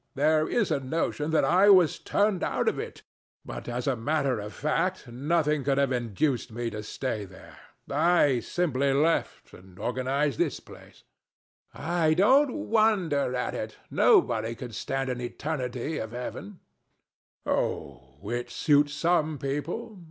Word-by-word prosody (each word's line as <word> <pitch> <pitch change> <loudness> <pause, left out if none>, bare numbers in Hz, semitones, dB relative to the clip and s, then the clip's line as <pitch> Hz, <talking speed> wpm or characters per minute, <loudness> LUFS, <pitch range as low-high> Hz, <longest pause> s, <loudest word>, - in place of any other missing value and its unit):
There 155 +2 +3
is 215 -8 +1
a 145 - +2
notion 150 +2 -2
that 160 - +3
I 190 +3 +5
was 185 -5 +5
turned 205 -3 +1
out - - -1
of - - +1
it; - - -7 0.4
but - - -7
as 120 +1 -3
a 135 - +1
matter 135 0 0
of 105 0 -6
fact 180 +4 -1
nothing 150 +4 0
could 135 0 +1
have 140 -1 +2
induced 120 +2 -1
me 115 +1 -3
to 105 - -5
stay 110 0 -4
there. 95 -1 -14 0.3
I 150 -3 +3
simply 140 -2 0
left 155 +4 0
it - - -12
and 90 0 -18
organized 130 +5 -1
this - - 0
place. - - -16 0.7
THE - - -14
STATUE. 145 - -7
I 165 -2 +2
don't 260 - +4 0.2
wonder 185 - +2
at 125 - -2
it. - - -5
Nobody 115 +1 +3
could 120 -1 -8
stand 135 +4 -2
an 125 0 -4
eternity 130 +2 -3
of 110 +1 -6
heaven. 150 +10 -7 0.8
THE - - -1
DEVIL. - - +3 0.6
Oh, - - -9
it 120 0 -3
suits 145 -1 +2
some 160 -3 +1
people. 165 - -4
145 Hz, 160 wpm, -27 LUFS, 125-165 Hz, 0.8 s, I